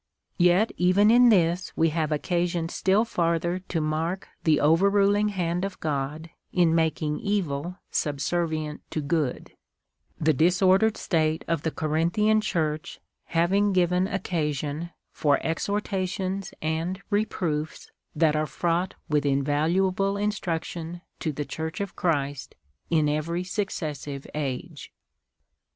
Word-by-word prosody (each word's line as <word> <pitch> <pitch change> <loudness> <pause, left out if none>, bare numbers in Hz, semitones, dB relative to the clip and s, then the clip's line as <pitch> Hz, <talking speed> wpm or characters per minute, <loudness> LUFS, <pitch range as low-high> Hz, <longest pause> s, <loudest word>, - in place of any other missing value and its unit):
Yet 180 +5 +4
even 190 +4 +4
in 245 +1 +7
this 175 -3 +2
we 165 0 +4
have 155 -1 -1
occasion 170 +2 0
still 195 +6 +2
farther 170 -2 0
to 185 -2 -3
mark 160 +4 -2 0.2
the 155 -2 +4
over 165 +6 +4
iniling 205 +1 +3
hand 180 -2 -1
of 195 -1 -4
God 150 +2 -3 0.2
in 175 -3 +3
making 155 -2 0
evil 180 -4 -2
subsement 155 +1 -1
to - - -3
good 150 -3 -1 0.4
— - - -42
the 155 0 +3
disordered 185 - +3
state 160 -3 0
of 165 -3 0
the 160 - 0
Corinthian 170 +9 +1
Church 155 -4 -2 0.3
having 195 +5 +2
given 180 0 +2
occasion 160 -5 -2 0.2
for 145 -2 +2
exhortations 190 +1 -2
and 165 +5 -2
reproofs 170 -7 -2 0.2
that 155 -1 +3
are 155 0 0
fraught 170 +5 -1
with 150 -1 +1
invaluable 165 +8 +1
instruction 175 -4 -3 0.2
to 160 - -1
the 145 0 -4
Church 160 +3 -5
of 200 -1 -4
Christ 145 -6 -1 0.3
in 155 -2 +3
every 160 +4 -1
suc 200 +2 -2
cessive 145 -5 -5
age. 140 -4 -5
170 Hz, 125 wpm, -26 LUFS, 155-190 Hz, 0.4 s, in